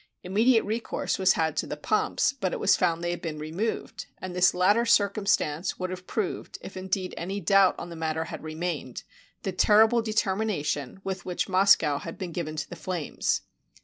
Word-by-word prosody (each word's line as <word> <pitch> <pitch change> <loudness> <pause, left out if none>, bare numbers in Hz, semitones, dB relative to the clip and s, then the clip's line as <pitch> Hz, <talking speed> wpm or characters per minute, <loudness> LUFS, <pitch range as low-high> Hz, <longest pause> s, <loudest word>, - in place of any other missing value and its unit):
Immediate 220 +6 +3
recourse 220 0 -2
was 190 0 +5
had 160 -1 0
to - - 0
the 150 - -5
pumps, 215 - +1
but 195 -10 -2
it - - -3
was - - +4
found 170 -2 0
they 175 - 0
had 175 - -4
been 160 -3 -4
removed; 165 +9 -4
and 185 -1 -7
this 180 +1 +4
latter 205 +6 +4
circumstance 200 -7 +1
would 185 0 -3
have 185 0 -7
proved, 210 -5 -3
if - - -9
in 190 0 -7
deed'any 190 0 -2
doubt 195 +1 +4
on 175 - -7
the - - -7
matter 160 0 -2
had - - -7
remained, 155 -5 -4 0.4
the 190 - -1
terrible 220 +5 +5
determination 195 - -1
with 190 -2 -4
which 180 -1 -2
Moscow 185 -6 +4
had 165 - -8
been 180 -2 -5
given 155 -2 -4
to 155 - -4
the - - -8
flames. 180 -5 -2
185 Hz, 185 wpm, -27 LUFS, 165-200 Hz, 0.4 s, was